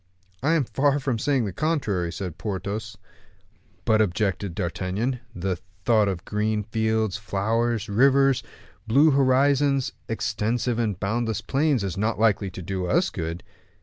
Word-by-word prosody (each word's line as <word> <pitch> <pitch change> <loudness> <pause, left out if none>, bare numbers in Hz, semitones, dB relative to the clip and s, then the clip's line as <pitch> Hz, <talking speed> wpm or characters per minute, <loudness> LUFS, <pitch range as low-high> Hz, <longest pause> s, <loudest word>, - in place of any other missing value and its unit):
"I 150 +5 +2
am 165 -4 +3
far 140 +3 +1
from 130 -5 -1
saying 135 -1 +1
the 100 - -4
contrary," 105 - -1
said 90 -4 -6
Porthos. 100 +1 -4 0.9
"But," 110 -2 +4
objected 95 -2 -1
D'Artagnan, 95 +7 -2 0.2
"the 90 0 -2 0.3
thought 110 -3 +4
of 95 -3 -3
green 105 0 -1
fields, 110 -1 0
flowers, 110 +2 -1
rivers, 135 +4 +4 0.5
blue 140 +7 +5
horizons, 135 0 +3 0.2
extensive 115 +2 -1
and 105 -5 -1
boundless 110 +2 -1
plains, 140 -4 +1
is 95 -1 -3
not 110 +3 0
likely 105 -3 +2
to 90 0 -8
do 95 +1 -3
us - - +2
good." 80 +2 -4
110 Hz, 140 wpm, -25 LUFS, 100-130 Hz, 0.9 s, blue